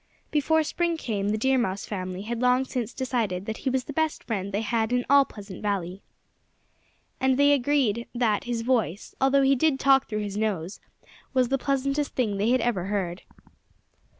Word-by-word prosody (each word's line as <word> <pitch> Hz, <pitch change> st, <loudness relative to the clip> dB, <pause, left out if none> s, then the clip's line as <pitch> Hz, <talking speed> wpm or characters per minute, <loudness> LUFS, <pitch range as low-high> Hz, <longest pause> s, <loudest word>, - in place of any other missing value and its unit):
Before 315 Hz, +2 st, +2 dB
spring 340 Hz, +2 st, -1 dB
came 205 Hz, -8 st, -2 dB
the 215 Hz, -, 0 dB
Deer 265 Hz, +3 st, +2 dB
Mouse 195 Hz, -4 st, -2 dB
family 185 Hz, -1 st, -5 dB
had 230 Hz, +2 st, -4 dB
long 250 Hz, +1 st, +3 dB
since 245 Hz, -3 st, -3 dB
decided 225 Hz, -8 st, -2 dB
that 220 Hz, +1 st, -4 dB
he -, -, -2 dB
was 260 Hz, 0 st, 0 dB
the 290 Hz, -, -8 dB
best 315 Hz, +1 st, -1 dB
friend 200 Hz, -4 st, -3 dB
they 205 Hz, +2 st, -1 dB
had 225 Hz, 0 st, 0 dB
in 245 Hz, 0 st, +1 dB
all 280 Hz, -1 st, +7 dB
Pleasant 200 Hz, -6 st, -10 dB
Valley. 195 Hz, -2 st, -2 dB, 1.2 s
And 260 Hz, 0 st, +2 dB
they 285 Hz, 0 st, +5 dB
all -, -, +6 dB
agreed 245 Hz, -4 st, +1 dB
that 225 Hz, -4 st, +1 dB
his 235 Hz, -1 st, -2 dB
voice, 225 Hz, -6 st, -1 dB
although 270 Hz, +1 st, +4 dB
he 270 Hz, 0 st, +4 dB
did 275 Hz, 0 st, +2 dB
talk 270 Hz, -1 st, +4 dB
through 215 Hz, -1 st, -2 dB
his 205 Hz, -1 st, -5 dB
nose, 200 Hz, -4 st, -2 dB, 0.6 s
was 255 Hz, -2 st, +3 dB
the 270 Hz, -, +1 dB
pleasantest 275 Hz, +2 st, -1 dB
they 210 Hz, -3 st, 0 dB
had 255 Hz, 0 st, +3 dB
ever 225 Hz, -7 st, 0 dB
heard. 190 Hz, -3 st, -2 dB
235 Hz, 185 wpm, -26 LUFS, 205-270 Hz, 1.2 s, all